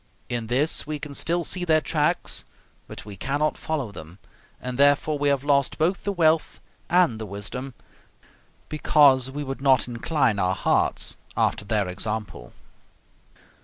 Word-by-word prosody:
In 120 -2 -3
this 140 +6 +2
we 155 0 -3
can 145 0 -8
still 170 +4 0
see 180 +2 -1
their 160 -3 +3
tracks, 155 +2 -1 0.4
but - - -9
we 105 -2 -9
cannot 145 +8 -1
follow 145 -9 -3
them, 85 -1 -11 0.4
and 125 +1 -6
therefore 145 +1 +3
we 145 0 +2
have 140 -1 +1
lost 140 -2 +1
both 175 +5 0
the 200 - 0
wealth 165 -4 +1 0.3
and 175 -11 +3
the 110 - -5
wisdom, 115 +6 -6 0.9
because 140 -4 +4
we 145 +2 -5
would 135 -1 -6
not 130 -4 +3
incline 120 -2 0
our 95 -1 +1
hearts - - +1 0.2
after - - +1
their 105 -2 0
example." 105 - -5
140 Hz, 150 wpm, -24 LUFS, 110-155 Hz, 0.9 s, because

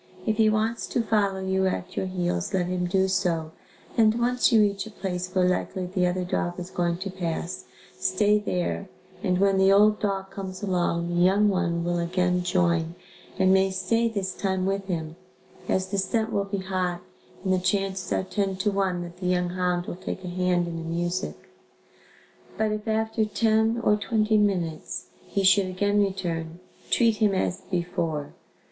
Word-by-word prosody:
If 215 -1 0
he 220 -1 +5
wants 220 +2 0
to 240 - 0
follow 200 -3 +1
you 190 0 +1
at 185 0 -3
your 190 - -1
heels, 175 - -1
let 180 -2 +1
him 180 0 -1
do 190 +1 +2
so 175 -4 0 0.4
and 220 0 +4
once 250 +2 +2
you 225 - +6
reach 200 0 0
a - - -8
place 180 -3 -4
where 185 -1 +2
likely 185 0 -1
the 180 0 0
other 180 +1 -1
dog 175 0 -2
is 180 +1 -7
going 170 -1 0
to 190 +1 -5
pass, 180 0 -4 0.3
stay 210 +2 +3
there 185 -1 -2 0.3
and 185 -3 +1
when 195 0 +3
the 190 0 +5
old 210 +2 +5
dog 195 -2 -2
comes 190 0 -7
along, 175 -3 0
the 175 0 +1
young 200 +3 +4
one 170 -3 0
will 175 0 0
again 180 +1 +1
join 175 -2 +1 0.4
and 190 -1 +4
may 190 0 +4
stay 230 +5 +1
this 200 -4 -2
time 190 -2 -1
with 195 0 -1
him, 165 -3 -3 0.5
as 190 - +1
the 200 0 0
scent 220 +3 0
will 200 -1 +1
be 200 0 -3
hot 185 -2 -2 0.4
and 190 -1 +1
the 185 - +2
chances 190 0 -1
are - - +1
ten 195 0 -1
to 200 +2 0
one 190 -3 0
that 175 0 -10
the 180 0 -3
young 180 -1 +1
hound 180 -1 -1
will - - -5
take 185 +1 -6
a - - -4
hand 180 -1 +1
in 165 -1 -4
the 165 - -5
music. 175 +3 -3 1.1
But 220 -1 +1
if 215 +1 -4
after 220 0 +1
ten, 220 +1 +2
or 210 - +4
twenty 215 0 +2
minutes, 175 -6 -1 0.2
he 200 - -1
should 190 0 +5
again 205 +3 +1
return, 175 -4 -2 0.3
treat 230 -3 +3
him 205 -2 +2
as 190 0 -1
before. 170 -5 -2
190 Hz, 185 wpm, -26 LUFS, 180-205 Hz, 1.1 s, you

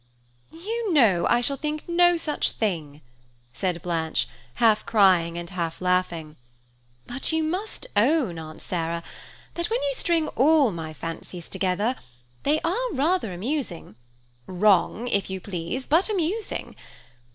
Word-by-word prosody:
"You 425 +6 -3
know 210 - +4
I 240 - +4
shall 275 +3 0
think 300 +1 -4
no 350 0 +4
such 305 -2 -1
thing," 155 -9 -2 0.5
said 180 +1 -2
Blanche, 165 -2 0 0.3
half 225 -3 +4
crying 185 -6 +4
and 170 0 -5
half 170 -3 -3
laughing, 180 -4 -1 0.7
"but 265 +5 -2
you 320 0 +1
must 370 +7 -3
own, 230 - +2
Aunt 155 -1 -9
Sarah, 170 -1 -2 0.5
that 345 +2 -2
when 465 +2 +1
you 280 -1 0
string 325 +2 +1
all 285 -2 +4
my 160 -3 -5
fancies 165 +2 -7
together, 200 +6 0 0.5
they 300 +2 +2
are 475 +10 -1
rather 305 - +1
amusing–wrong, 175 - -1
if 200 -5 0
you 190 0 -3
please, 185 +7 -4
but 335 +8 +3
amusing. 410 +2 -2
210 Hz, 130 wpm, -25 LUFS, -, 0.7 s, know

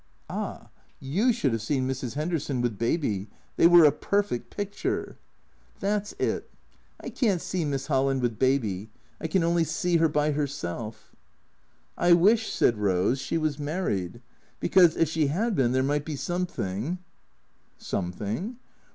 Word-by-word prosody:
" - - -38
Ah, - - -5 0.3
you 190 - +1
should 185 - 0
have 115 - -1
seen 130 +3 0
Mrs. 130 -1 -4
'Enderson 155 -4 -1
with 120 -4 -1
Baby. 115 - -1 0.3
They - - +6
was 175 -2 +8
a 150 - +7
perfect 200 -3 -1
picture." 205 0 -3 0.3
" - - -34
That 205 +1 0
's - - -8
it. - - -2 0.5
I - - -7
can't 205 -8 +1
see 175 0 -2
Miss 140 -2 -2
Holland 135 -2 +1
with 115 -3 -1
Baby. 110 -7 +1 0.3
I 160 - -3
can 170 +2 +1
only 170 0 +2
see 175 +1 +1
her 165 -1 +3
by 150 0 +1
herself." 115 -7 -4 0.4
" - - -40
I - - +9
wish," 215 +6 +4
said 115 - +2
Eose, 100 +5 +1
" - - -5
she 165 - -1
was 155 -2 -1
married. 125 - -2 0.4
Because, 175 -4 +5
if 165 - +3
she 155 -2 +1
'ad 215 +10 0
been, 125 -6 +2
there 130 +1 +2
might 145 +2 0
be 155 - -4
something 145 - -3 0.4
" - - -41
"Something?" 105 - -4
145 Hz, 170 wpm, -27 LUFS, 120-175 Hz, 0.5 s, I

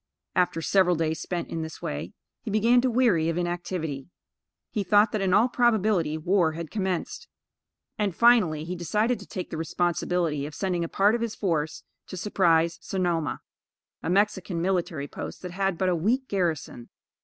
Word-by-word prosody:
After 180 -3 +1
several 185 -1 +3
days 160 0 -1
spent 175 -2 -4
in 165 - -3
this 160 -1 -7
way, 75 0 -5 0.3
he - - -6
began 230 +4 +4
to 255 - +1
weary 225 -10 +3
of 165 - -2
inactivity. 175 -5 -3 0.6
He 215 - -1
thought 205 +3 +4
that, 215 - -1
in 190 -1 +1
all 210 +6 +5
probability, 215 -10 +2
war 170 0 +2
had 165 -1 -6
commenced; 190 -5 -3 0.7
and, 200 -4 0
finally, 210 -11 +4
he 175 +3 -4
decided 210 +8 0
to - - -12
take 185 - -6
the 160 - -4
responsibility 165 -2 -1
of 150 - -10
sending 180 -2 -1
a 165 - -4
part 205 +2 +3
of 235 - -1
his 230 -2 -2
force 160 -6 -2 0.2
to 185 - -7
surprise 170 -4 +2
Sonoma 175 -5 -1 0.6
a - - -3
Mexican 190 -2 +1
military 170 -5 -1
post - - -8
that 180 - -5
had 195 -1 -1
but 185 - 0
a 180 - +2
weak 235 +11 0
garrison. 165 -10 -2
180 Hz, 175 wpm, -26 LUFS, 165-205 Hz, 0.7 s, all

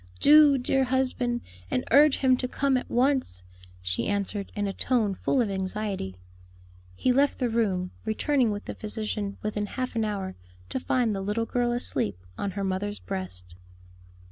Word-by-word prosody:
"Do, 295 -2 +7
dear 265 +1 +2
husband, 250 -2 0 0.3
and 125 - 0
urge 290 0 +6
him 260 -1 +4
to 250 - -2
come 275 +1 +1
at 255 - -2
once," 250 - +1 0.4
she 90 +6 0
answered, 200 0 -2
in 205 -1 -1
a 195 - -2
tone 225 -5 +1
full 255 +7 +1
of 215 -4 0
anxiety. 190 - -3 0.8
He 250 - +2
left 280 +2 +3
the 245 -3 0
room, 190 -6 0
returning 245 +3 +1
with 205 0 -4
the - - -5
physician 210 -2 -4
within 210 -1 -2
half 255 +3 -4
an 225 - +1
hour, 200 -3 -3 0.3
to - - -2
find 245 -3 +1
the 195 - -3
little 210 +4 -1
girl 240 0 0
asleep 170 - -2 0.2
on 200 - -2
her 200 - -1
mother's 195 +2 -2
breast. 90 - -6
215 Hz, 170 wpm, -27 LUFS, 195-255 Hz, 0.8 s, Do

